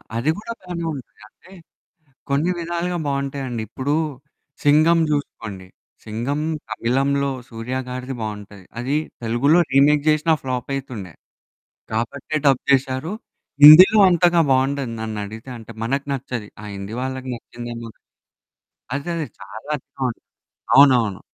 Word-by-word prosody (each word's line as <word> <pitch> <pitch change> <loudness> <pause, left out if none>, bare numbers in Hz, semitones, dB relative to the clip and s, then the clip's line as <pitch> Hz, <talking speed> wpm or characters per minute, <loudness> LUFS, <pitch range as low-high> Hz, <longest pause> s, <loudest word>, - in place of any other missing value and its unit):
అది 120 +6 0
గూడా 230 +2 -6
బానే 175 -2 -5
ఉంటది. 135 -4 -10
అంటే 185 - -21 0.8
కొన్ని 145 +6 +1
విధాలుగా 170 +1 -2
బావుంటాయండి. 140 -3 -3
ఇప్పుడు 135 +6 -2 0.7
'సింగం' 155 +3 +5
జూసుకోండి. 110 -10 -4 0.4
'సింగం' 120 +8 -3 0.3
తమిళంలో 135 +5 0 0.2
సూర్య 115 +2 -5
గారిది 130 +1 -5
బావుంటది. 105 -2 -7 0.2
అది 130 +4 -1 0.3
తెలుగులో 125 +9 +3
రీమేక్ 145 +2 +4
జేషినా 155 +1 +3
ఫ్లాప్ 125 -1 -4
అయితుండే. 120 - -7 0.8
కాబట్టే 120 +7 -3
డబ్ 135 -2 +4
చేశారు. 135 +5 0 0.5
హిందీలో 185 +9 +10
అంతగా 175 -1 +4
బావుండదు, 135 -1 +1
నన్నడిగితే. 110 +2 -6
అంటే 115 0 -11
మనకు 140 +4 -1
నచ్చది. 125 -5 -4
ఆ - - -9
హిందీ 100 +2 -6
వాళ్ళకి 130 0 -4
నచ్చిందేమో 120 0 -8
గా - - -37 1.0
అదే 145 +5 -4
అదే. 160 -3 -3
చాలా 140 +8 -7 0.2
చోట్ 125 -3 -2 0.6
అవునవును. 125 -8 +5
135 Hz, 120 wpm, -21 LUFS, 115-150 Hz, 1.0 s, హిందీలో